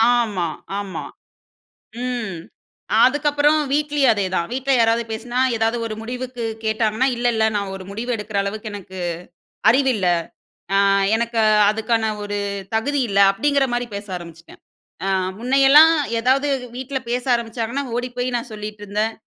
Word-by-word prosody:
ஆமா. 205 -8 0 0.3
ஆமா. 195 -2 -5 1.0
ம். 235 -8 -3 0.7
அதுக்கப்பறம் 290 +2 +3
வீட்லயும் 290 -3 +2
அதேதான். 185 -4 -1
வீட்ல 265 +2 0
யாராவது 230 0 +3
பேசுனா, 240 +3 -4 0.2
ஏதாவது 225 +1 +1
ஒரு 215 - -4
முடிவுக்கு 245 +1 -6 0.2
கேட்டாங்கன்னா, 220 +3 +1
"இல்ல, 240 +1 -1
இல்ல. 220 0 +2
நான் 200 -1 -3
ஒரு 190 - -9
முடிவு 225 +5 -5
எடுக்கிற 210 -1 -4
அளவுக்கு 215 +2 -5
எனக்கு 190 -2 -9 0.7
அறிவு 265 +3 +4
இல்ல. 190 -3 0 0.7
அ - - +4 0.4
எனக்கு 235 0 -1 0.3
அதுக்கான 220 0 0
ஒரு 205 0 -3 0.4
தகுதி 280 +5 0
இல்ல" 200 - -1
அப்டீங்கிற 280 +5 +1
மாதரி 240 0 -1
பேச 205 +1 -6
ஆரம்பிச்சுட்டேன். 165 -1 -13 0.8
முன்னையெல்லாம் 275 +6 +6 0.3
ஏதாவது 265 +4 +2 0.3
வீட்ல 265 +1 -4
பேச 245 +1 -1
ஆரம்பிச்சாங்கன்னா, 235 +3 -3
ஓடிப்போயி 245 0 -3
நான் 235 0 -7
சொல்லிட்ருந்தேன் 210 +1 -3
230 Hz, 130 wpm, -21 LUFS, 210-260 Hz, 1.0 s, முன்னையெல்லாம்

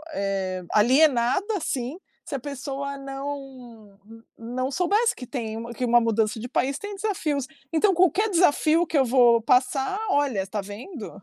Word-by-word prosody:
eh, 190 -2 -2
alienada, 260 - +3
assim, 270 -3 -3 0.3
se - - -8
a - - -2
pessoa 280 +1 -5
não 270 -6 -8 0.4
não 255 +4 -3
soubesse 410 - +2
que 250 - -9
tem 225 -5 -4
um 230 +1 -6
que 250 - -4
uma 240 0 +5
mudança 225 -1 0
de 240 - -5
país 270 +2 0
tem 410 0 -6
desafios. 320 -10 -2 0.3
Então, 385 +5 +3
qualquer 370 +5 +3
desafio 335 -2 +3
que 315 - 0
eu 270 - +5
vou 240 -2 +5
passar: 265 - +1
"Olha, 260 -10 +1
tá 205 +2 -3
vendo? 215 - -8
265 Hz, 155 wpm, -25 LUFS, 230-305 Hz, 0.4 s, uma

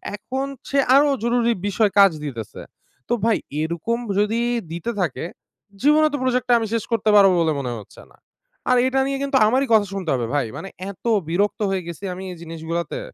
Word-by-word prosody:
এখন 260 +6 -4 0.2
সে 280 - +2 0.2
আরো 285 +1 +5
জরুরি 235 0 +2
বিষয় 205 +1 +1
কাজ 195 -2 +7
দিতেছে। 115 -7 -7 0.5
তো - - +2
ভাই 230 -2 +3 0.2
এরকম 170 +9 -2 0.2
যদি 215 +3 +1 0.3
দিতে 170 +7 -3
থাকে, 175 - -2 0.6
জীবনেও 305 +2 +4
তো 290 - 0
প্রজেক্টটা 250 -1 +1
আমি 225 - -2
শেষ 230 -2 0
করতে 225 -2 +1
পারব 200 -1 +7
বলে 160 -2 +2
মনে 125 -3 -3
হচ্ছে 105 - -14
না! - - -22 0.5
আর 250 - +5
এটা 265 +1 +1
নিয়ে 275 0 -1
কিন্তু 275 -1 +1
আমারই 260 +4 +2
কথা 215 -2 +5
শুনতে 185 -5 -4
হবে, 125 -3 -1
ভাই! 140 -3 +1
মানে 195 - -7 0.2
এত 200 - -19 0.2
বিরক্ত 200 +6 0
হয়ে 190 -2 -1
গেছি 170 +3 -8
আমি 185 +1 -8
এই - - -12
জিনিসগুলাতে! 165 - -4
210 Hz, 185 wpm, -22 LUFS, 170-250 Hz, 0.6 s, কাজ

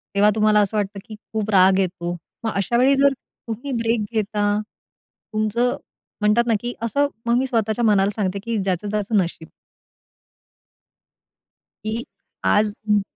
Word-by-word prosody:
तेव्हा 205 +1 +5
तुम्हाला 215 -1 +4
असं 205 +2 0
वाटतं, 200 -1 -2
की 215 - -9
खूप 215 0 -5
राग 190 -1 +5
येतो. 175 -2 -2 0.3
मग 225 - 0
अशा 200 +4 +1
वेळी 265 +3 +5
जर 280 0 +4 0.3
तुम्ही 240 +5 -5
ब्रेक 230 0 +1
घेता, 205 -1 0 0.8
तुमचं 215 +3 +1 0.5
म्हणतात 210 +3 +4
ना, 230 - +3
की 245 0 -3
असं, 255 +6 +1 0.2
मग 235 +1 +3
मी 260 - +1
स्वतःच्या 225 -1 0
मनाला 200 -2 +4
सांगते, 200 -2 -1
की 230 0 -2
"ज्याचं 195 0 -1
त्याचं 210 +1 0
नशीब." 170 -3 -1 2.4
की 225 +2 -3 0.4
आज 210 0 +3 0.2
हं. 210 -1 +4
215 Hz, 145 wpm, -22 LUFS, 200-230 Hz, 2.4 s, तेव्हा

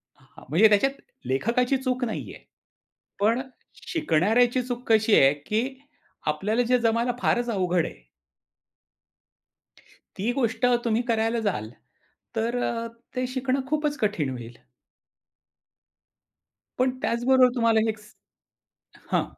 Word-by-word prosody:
हां, - - -18
म्हणजे 185 +9 +6
त्याच्यात 210 +6 +3 0.3
लेखकाची 235 - +1
चूक 255 -1 -2
नाही 220 - -5
आहे. - - -14 0.8
पण 225 +5 +2 0.5
शिकणाऱ्याची 245 - +2
चूक 245 0 -6
कशी 220 -1 +4
आहे, 135 +1 +5
की 220 - -3 0.5
आपल्याला 205 +10 0
जे 250 - +5
जमायला 235 +1 +1
फारच 240 0 +1
अवघड 180 -5 +1
आहे - - -10 2.1
ती 215 +6 0
गोष्ट 245 -2 0 0.2
तुम्ही 230 0 +2
करायला 225 +1 +1
जाल, 110 - -4 0.7
तर 230 +2 -1
अ, 230 0 -2 0.3
ते 255 0 0
शिकणं 260 +1 -1
खूपच 300 -1 0
कठीण 200 -10 0
होईल. 120 0 -10 2.2
पण 255 +1 +3
त्याचबरोबर 255 +2 +3
तुम्हाला 230 -2 +3
हेचं 215 -1 -7 0.8
हां. - - +2
230 Hz, 110 wpm, -25 LUFS, 210-250 Hz, 2.2 s, म्हणजे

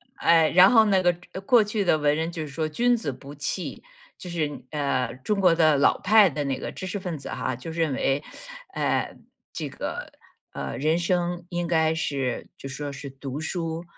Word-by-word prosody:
哎， 165 -2 +4
然 185 +5 +7
后 225 -2 +6
那 195 -2 +3
个 175 -1 +3 0.3
过 240 -4 +6
去 210 0 -1
的 175 - +3
文 150 -1 +2
人 165 +2 -2
就 165 - -5
是 155 - -4
说 155 +2 -2
君 240 +9 +2
子 185 -11 -3
不 135 +2 -11
器， 145 +6 -4 0.4
就 180 - -9
是， 155 -4 -3
呃， 140 -5 -1
中 210 -2 0
国 180 -3 +5
的 155 -3 +4
老 140 - +4
派 205 -1 +6
的 145 0 -3
那 135 -1 -2
个 - - -5
知 185 - -7
识 200 +2 -3
分 175 -4 -4
子 140 - -9
哈， 130 - -2
就 145 +7 -8
认 160 -4 0
为， 135 +2 0 0.5
呃， - - -1 0.4
这 155 -3 -4
个， - - -6 0.4
呃， 115 - -5
人 155 +4 +1
生 175 0 -1
应 175 -1 -2
该 160 -1 +2
是 140 -5 -2
就 135 - -8
说 145 +1 -5
是 140 0 -8
读 135 +1 -6
书， 165 0 -3
160 Hz, 215 characters per minute, -25 LUFS, 145-180 Hz, 0.5 s, 然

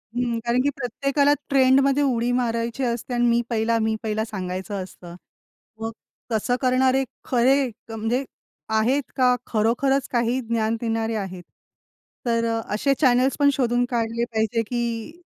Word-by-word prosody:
हं. 240 -2 0
कारण 240 +1 +2
की 280 - +2
प्रत्येकाला 275 +3 +1 0.2
ट्रेंडमध्ये 275 +1 +4
उडी 245 -3 +1
मारायची 235 +1 -1
असते 240 0 -2
आणि 240 0 +2
मी 235 0 +3
पहिला, 230 0 +1
मी 220 0 +1
पहिला, 220 0 -1
सांगायचं 190 -1 -4
असतं. 175 -2 -12 0.7
मग 225 0 -2 0.4
तसं 225 +3 +1
करणारे 260 +1 +3 0.2
खरे 260 +2 +3 0.2
क - - -10
म्हणजे 225 +4 -1 0.6
आहेत 260 +6 +2
का 250 -1 +4
खरोखरच 245 +5 +1
काही 240 +1 +1
ज्ञान 225 -1 0
देणारे 225 -1 -1
आहेत? 190 -4 -5 0.8
तर 230 -1 +1 0.2
असे 245 +7 +1
चॅनल्स 255 -1 +3
पण 285 0 +5
शोधून 245 -2 +1
काढले 235 -1 -1
पाहिजे 220 +1 +1
की 240 +7 -3
235 Hz, 140 wpm, -23 LUFS, 225-260 Hz, 0.8 s, पण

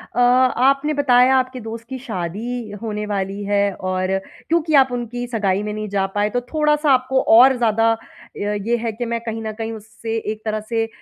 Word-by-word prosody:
अ, - - 0
आपने 255 +4 +3
बताया, 260 -2 +4
आपके 255 0 -1
दोस्त 230 +1 -7
की 265 - -4
शादी 220 +2 -5
होने 210 -2 -3
वाली 200 0 -3
है 200 0 +1
और 185 +1 -1 0.3
क्योंकि 320 -1 +1
आप 265 -2 +5
उनकी 245 0 -4
सगाई 205 -5 0
में 210 0 -4
नहीं 215 0 -4
जा 195 -1 0
पाए, 205 +1 +2
तो 245 +3 -1
थोड़ा-सा 300 -1 +2
आपको 260 +1 +2 0.2
और 260 +2 +7
ज़्यादा 225 -1 +2
अ, 225 - 0 0.4
ये 205 +3 -1
है 230 0 -2
कि 240 +2 -4
मैं 235 0 -2
कहीं 225 -1 -5
न 220 - -3
कहीं 225 0 -3
उससे 225 +1 -6 0.2
एक 215 - -7
तरह 215 0 -1
से 225 -1 0
230 Hz, 195 wpm, -20 LUFS, 210-255 Hz, 0.4 s, और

